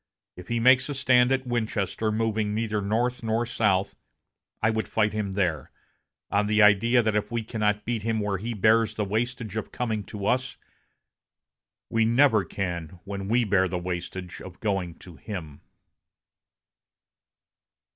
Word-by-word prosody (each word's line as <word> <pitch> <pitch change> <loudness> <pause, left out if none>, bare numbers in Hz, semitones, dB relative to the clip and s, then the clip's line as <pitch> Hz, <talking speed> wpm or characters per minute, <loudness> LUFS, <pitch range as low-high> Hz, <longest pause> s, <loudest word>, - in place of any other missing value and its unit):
If 90 -1 -11
he 120 - -1
makes 130 +3 +5
a 145 - -3
stand 125 -2 +4
at 135 0 +1
Winchester, 110 -3 -1
moving 110 -1 0
neither 110 -2 -1
north 120 +5 0
nor 115 +1 0
south, 100 -5 +1 0.6
I 110 - +2
would 110 0 -2
fight 105 -2 +1
him 105 -3 -2
there, 85 -8 -1 0.6
on 105 +1 +2
the 105 +1 +2
idea 110 +4 +5
that 110 -1 0
if 105 - 0
we 115 -1 -1
cannot 105 -2 -1
beat 115 -2 -1
him 110 0 -1
when 100 -2 -1
he 115 +3 -4
bears 110 +2 +3
the 105 - -1
wastage 110 +1 -2
of 110 - -4
coming 110 -4 -2
to 100 +1 -6
us, 130 +4 0 1.3
we 115 0 +3
never 115 -2 +4
can 85 -3 -5
when 100 -1 -5
we 120 +3 +3
bear 95 -3 +2
the 90 - -3
wastage 90 0 -5
of 90 -2 -11
going 95 -5 -2
to 85 -4 -14
him." 80 -9 -7
110 Hz, 155 wpm, -26 LUFS, 100-115 Hz, 1.3 s, makes